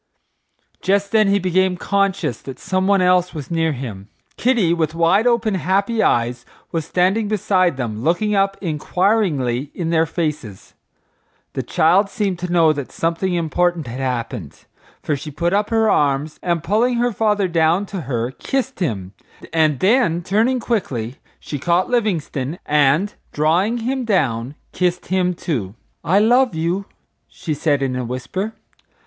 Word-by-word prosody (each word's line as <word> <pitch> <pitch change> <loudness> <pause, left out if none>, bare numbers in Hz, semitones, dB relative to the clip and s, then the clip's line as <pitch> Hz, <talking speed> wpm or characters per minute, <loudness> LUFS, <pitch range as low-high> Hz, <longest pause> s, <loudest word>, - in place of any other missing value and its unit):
Just 200 +1 +1
then 215 -2 +4
he 200 0 +3
became 185 0 +1
conscious 195 - 0
that 135 -2 -8
someone 190 0 +1
else 180 -1 +2
was 150 0 -7
near 165 -1 +1
him. 110 -7 -7 0.3
Kitty, 230 -9 +2
with 160 -2 -1
wide 180 +7 +3
open, 235 -3 +2
happy 195 +5 +1
eyes, 120 - +1 0.3
was 165 -2 -2
standing 190 +6 +1
beside 185 -6 +1
them 110 -4 -4
looking 175 - +1
up 195 0 +1
inquiringly 155 - 0
in 170 -2 -2
their 165 -1 +2
faces. 150 - -4 0.8
The - - -2
child 195 +5 +3
seemed 195 -3 -2
to 180 0 -4
know 165 -3 +4
that 140 -3 -6
something 170 +2 -1
important 175 0 0
had 120 +2 -6
happened, 120 - -4 0.4
for 150 - 0
she 145 +3 -7
put 170 +5 -1
up 205 +1 +1
her 225 -1 +2
arms, 145 -3 +1
and 170 -2 -1
pulling 230 +7 +2
her 240 +1 +1
father 210 -2 +1
down 170 +3 +2
to 195 -2 -5
her 120 -3 -2
kissed 265 - -3
him, 100 - -3 0.4
and 155 -4 +2
then 185 -5 +3
turning 225 +8 +1
quickly 135 - -2 0.2
she 145 - -6
caught 175 - +1
Livingstone 170 - -1
and, 150 +7 +2 0.2
drawing 175 +10 +1
him 255 +3 -2
down, 135 - 0 0.2
kissed 180 -1 -1
him 180 -1 +1
too. 115 - -3 0.3
"I 170 +4 +2
love 240 +1 +4
you," 170 +5 -1 0.4
she 160 - -5
said, 145 -1 +1
in 130 -2 -1
a 125 - -2
whisper. 130 - -4
175 Hz, 155 wpm, -20 LUFS, 145-200 Hz, 0.8 s, then